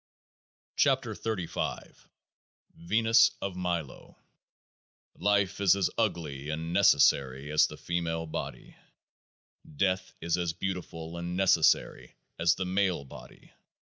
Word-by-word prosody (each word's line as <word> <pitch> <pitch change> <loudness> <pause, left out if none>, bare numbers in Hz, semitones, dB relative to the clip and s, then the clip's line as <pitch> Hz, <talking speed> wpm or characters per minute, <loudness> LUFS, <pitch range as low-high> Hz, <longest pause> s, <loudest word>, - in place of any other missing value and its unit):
44 - - +2 0.3
KEOAAH - - -3
AE - - -25 0.8
VENUS 115 +6 +3
OF 95 -2 -4
MILO 85 -5 -4 1.0
Life 100 -1 +1
is 95 -2 +5
as 100 -2 0
ugly 80 -10 -2
and 80 +2 -4
necessary 70 -7 +3
as 75 - +4
the - - -10
female 85 -1 -3
body. 80 - -7 1.0
Death 95 +1 0
is 85 +1 -1
as 85 -2 -1
beautiful 85 -2 -5
and 85 +1 -4
necessary 90 -4 +2 0.2
as 85 0 +3
the 95 - -3
male 90 -5 0
body. - - -14
85 Hz, 110 wpm, -29 LUFS, 80-95 Hz, 1.0 s, is